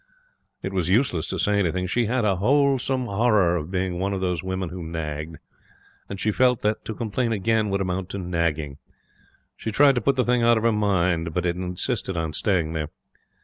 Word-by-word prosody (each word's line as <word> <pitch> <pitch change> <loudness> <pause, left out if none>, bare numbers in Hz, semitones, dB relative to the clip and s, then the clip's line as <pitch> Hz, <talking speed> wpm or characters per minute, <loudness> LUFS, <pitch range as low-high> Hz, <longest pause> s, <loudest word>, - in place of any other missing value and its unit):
It 95 - -4
was 90 -2 0
useless 95 - +2
to - - -3
say 105 0 +2
anything. 90 -1 0
She 115 +5 0
had 125 0 0
a 100 -3 +2
wholesome 135 +2 +2
horror 100 -5 +2
of 80 -1 -3
being 90 -1 -2
one 100 +1 -1
of 95 - -2
those 90 -3 -1
women 95 -1 -3
who 90 +1 -7
nagged; 80 -1 -5 0.7
and 100 - -6
she 110 - +1
felt 125 +2 +2
that 105 +1 0
to 110 - -5
complain 115 +1 -1
again 110 0 +1
would 100 0 0
amount 90 0 -2
to 100 - -5
nagging. 85 -5 -2 0.8
She 110 - -4
tried 140 +5 +5
to 125 - -1
put 135 +5 +2
the 125 - +1
thing 125 0 +2
out 115 0 +5
of 110 - -2
her 115 - +4
mind, 90 -6 +1
but 90 -1 0
it 85 -1 0
insisted 90 +2 -3
on 80 -1 -2
staying 85 -3 0
there. 80 -2 -2
95 Hz, 205 wpm, -24 LUFS, 85-115 Hz, 0.8 s, tried